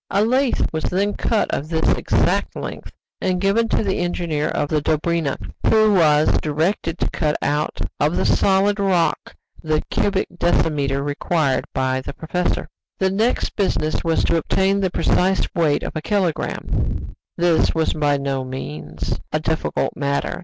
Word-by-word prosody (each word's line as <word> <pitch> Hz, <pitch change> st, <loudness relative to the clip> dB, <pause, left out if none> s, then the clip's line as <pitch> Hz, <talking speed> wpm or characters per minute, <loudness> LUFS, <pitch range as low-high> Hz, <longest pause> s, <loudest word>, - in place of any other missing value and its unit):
A 200 Hz, +2 st, +2 dB
lath 255 Hz, -2 st, +1 dB
was 160 Hz, -, -2 dB
then 200 Hz, +3 st, 0 dB
cut 220 Hz, -3 st, 0 dB
of 150 Hz, -, -2 dB
this 160 Hz, -1 st, 0 dB
exact -, -, +1 dB
length -, -, -6 dB, 0.3 s
and 185 Hz, -1 st, 0 dB
given 200 Hz, +4 st, +2 dB
to -, -, +1 dB
the 195 Hz, -2 st, -1 dB
engineer 170 Hz, -4 st, -1 dB
of 145 Hz, -, -1 dB
the 155 Hz, -2 st, +1 dB
Dobryna, 155 Hz, -1 st, 0 dB, 0.3 s
who 215 Hz, -1 st, +5 dB
was 155 Hz, -4 st, +4 dB
directed 160 Hz, +3 st, -1 dB
to -, -, -1 dB
cut 150 Hz, -2 st, 0 dB
out 150 Hz, +1 st, -1 dB, 0.2 s
of 150 Hz, +3 st, +2 dB
the -, -, +1 dB
solid 200 Hz, +1 st, +3 dB
rock 190 Hz, -4 st, 0 dB, 0.3 s
the 155 Hz, -1 st, 0 dB
cubic 195 Hz, -1 st, +1 dB
decimeter 140 Hz, -5 st, +1 dB
required 145 Hz, 0 st, 0 dB
by 130 Hz, 0 st, 0 dB
the 140 Hz, -, -7 dB
professor. 175 Hz, +4 st, -2 dB, 0.3 s
The 190 Hz, 0 st, +1 dB
next 220 Hz, +5 st, 0 dB
business 155 Hz, -6 st, 0 dB
was 165 Hz, -1 st, +1 dB
to 170 Hz, -, +2 dB
obtain 190 Hz, +4 st, +1 dB
the 190 Hz, -2 st, +1 dB
precise 185 Hz, +2 st, +1 dB
weight 160 Hz, -5 st, +1 dB
of -, -, -5 dB
a 155 Hz, -, -2 dB
kilogramme. 185 Hz, -2 st, -2 dB, 0.2 s
This 170 Hz, -2 st, +2 dB
was 160 Hz, 0 st, +1 dB
by 145 Hz, -2 st, +1 dB
no 135 Hz, -1 st, -2 dB
means 75 Hz, -, -5 dB
a 155 Hz, -, +1 dB
difficult 160 Hz, +1 st, -1 dB
matter. 140 Hz, 0 st, -1 dB
165 Hz, 160 wpm, -21 LUFS, 150-190 Hz, 0.3 s, who